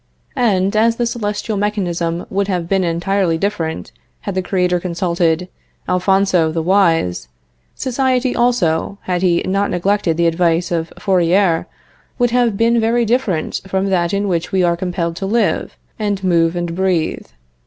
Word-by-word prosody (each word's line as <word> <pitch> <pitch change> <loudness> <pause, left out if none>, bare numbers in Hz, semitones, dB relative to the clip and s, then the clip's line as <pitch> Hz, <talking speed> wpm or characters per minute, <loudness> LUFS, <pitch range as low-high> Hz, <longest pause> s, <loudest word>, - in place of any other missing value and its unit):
And, 200 -4 +2
as 230 +2 +3
the 240 - -1
celestial 215 -2 -3
mechanism 175 -5 -2
would 195 0 0
have 180 -4 -2
been 195 +1 +1
entirely 175 +1 0
different 160 - -3 0.3
had 200 - -4
the 185 - 0
Creator 180 -1 0
consulted 170 -1 0 0.4
Alphonso 185 -3 +2
the 165 0 -2
Wise, 165 - +2 0.5
society, 260 0 0
also, 200 -7 +1
had 180 -1 -1
He 175 -2 +2
not 195 +2 0
neglected 180 -2 0
the 170 - +2
advice 170 +1 +1
of 165 -1 -2
Fourier, 180 -2 +2 0.5
would 245 -1 +2
have 240 -4 +2
been 230 +2 +3
very 230 +1 +2
different 215 -9 -1
from 190 +1 -1
that 175 -2 +1
in 200 0 -1
which 175 -1 -1
we 190 -2 +2
are 170 -1 +2
compelled 175 -1 -3
to 195 - -3
live, 230 +3 0 0.2
and 205 -2 -2
move, 170 -2 +2
and 175 -1 -3
breathe. 180 -3 -1
185 Hz, 155 wpm, -18 LUFS, 170-205 Hz, 0.5 s, as